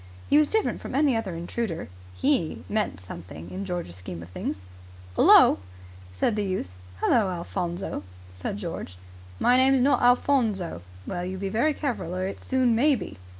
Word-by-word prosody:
He 290 - +7
was 305 - +4
different 440 -1 +1
from - - -6
any 280 -3 +3
other 205 -6 -2
intruder. 170 +1 -3 0.3
He 265 - 0
meant 215 - -1
something 85 -2 -9
in 195 +2 -4
George's 175 - -4
scheme 90 -2 -7
of 85 - -12
things. 90 +1 -5 0.5
"'Ullo!" - - +7 0.5
said 95 - 0
the 210 - 0
youth. 185 - -3 0.3
"Hullo, 220 -6 +3
Alphonso!" 175 - -3 0.3
said 90 - -5
George. 165 - -6 0.4
"My 250 +1 +4
name's 265 0 +5
not 280 +3 +3
Alphonso." 240 - +2 0.2
"Well, 175 -1 -3
you 185 +1 -4
be 195 +1 -3
very 240 +9 +1
careful 235 - -3
or 185 0 -1
it 195 - -5
soon 255 -2 +2
may 280 +5 +4
be." - - -7
195 Hz, 165 wpm, -26 LUFS, 170-250 Hz, 0.5 s, He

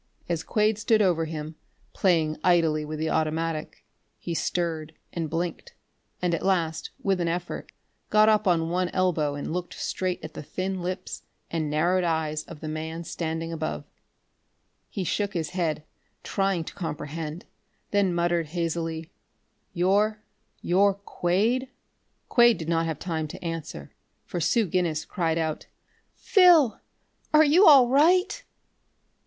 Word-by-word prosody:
As 170 -2 -1
Quade 215 +4 +1
stood 220 0 +3
over 175 -5 +2
him, 155 0 -6 0.4
playing 160 -5 +2
idly 165 -4 +3
with 155 +1 -5
the 160 +1 -1
automatic, 160 0 -2 0.3
he 170 - -5
stirred, 160 -2 -2 0.2
and 165 -3 -3
blinked, 170 +2 -4 0.5
and 175 -1 +1
at 165 - -1
last, 170 -4 0
with 195 -2 +1
an 170 - 0
effort, 175 +1 -4 0.4
got 215 0 +5
up 215 -1 +3
on 165 -2 +2
one 180 0 0
elbow 165 -6 +1
and 145 +2 -4
looked 180 0 -4
straight 185 -1 -2
at 155 - -9
the - - -7
thin 185 +5 -4
lips 180 +1 -5 0.3
and 160 -2 -1
narrowed 175 +5 +2
eyes 160 -2 -1
of 165 -3 -11
the 155 - -5
man 160 +2 -4
standing 165 0 -4
above. 155 - -3 1.1
He 195 - -3
shook 205 +2 -1
his 160 -2 -2
head, 165 -5 -1 0.4
trying 195 -3 0
to - - -9
comprehend, 160 -1 -5 0.5
then 200 -2 +2
muttered 170 -1 0
hazily: 165 0 -3 0.6
"You 200 +4 +2 0.5
you're 195 +2 +3
Quade?" 200 +6 0 0.6
Quade 240 -3 +5
did 160 - -6
not 165 -1 +1
have 160 -3 -3
time 160 -3 -3
to 150 - -9
answer, 160 - -6 0.3
for 175 - -4
Sue 215 +8 +2
Guinness 170 -4 -1
cried 165 -4 -1
out: 160 -2 -2 0.5
"Phil! 345 - +5 0.6
Are 310 - +8
you 330 +7 +6
all 275 -5 +8
right?" 350 - +3
170 Hz, 145 wpm, -26 LUFS, 160-195 Hz, 1.1 s, Are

